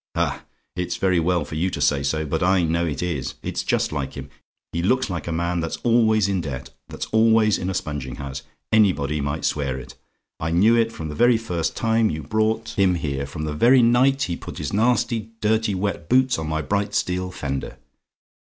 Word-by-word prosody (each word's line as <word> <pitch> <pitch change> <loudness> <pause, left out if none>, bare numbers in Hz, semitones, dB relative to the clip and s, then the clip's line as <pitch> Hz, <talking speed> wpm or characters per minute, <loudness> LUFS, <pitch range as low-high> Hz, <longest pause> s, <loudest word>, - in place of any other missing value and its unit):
"Ah! - - -1 0.3
it's 90 0 -2
very 95 -2 +2
well 85 -1 +1
for - - -10
you 85 +5 0
to - - -5
say 70 -1 +2
so; 80 +3 -1
but 80 +2 -2
I 95 0 +3
know 85 +1 +1
it 75 +1 -3
is; 70 -7 -3
it's - - -2
just - - 0
like 70 -3 -3
him. 70 -1 -8 0.4
He 85 - -1
looks 125 +4 +1
like 85 -2 -4
a - - -2
man 85 +1 -1
that's 80 -1 -3
always 110 -3 +3
in 95 -2 0
debt 70 -5 -6 0.2
that's - - -5
always 110 -1 +4
in 90 - -2
a 95 - -2
sponging 75 -5 -4
house. 70 -1 -6 0.3
Anybody 80 -9 +2
might 70 +3 -2
swear 70 -3 -1
it. 65 - -9 0.5
I 80 - -2
knew 100 +8 +4
it 115 -1 +2
from 80 -7 -6
the - - -5
very 120 +7 +4
first 90 -7 -2
time 115 -1 +2
you 75 0 -4
brought 110 +6 0
him 95 -2 +4
here 70 -4 -3
from 75 +2 -6
the 75 -1 -2
very 120 - +5
night 130 +4 +4
he 85 - -2
put - - -9
his - - -4
nasty 115 0 +1
dirty 110 -1 +1
wet 95 -3 -3
boots 130 -5 +3
on 80 -1 -4
my 80 0 -1
bright 100 +3 -1
steel 90 0 -1
fender. 70 -7 -5
90 Hz, 210 wpm, -23 LUFS, 75-110 Hz, 0.5 s, very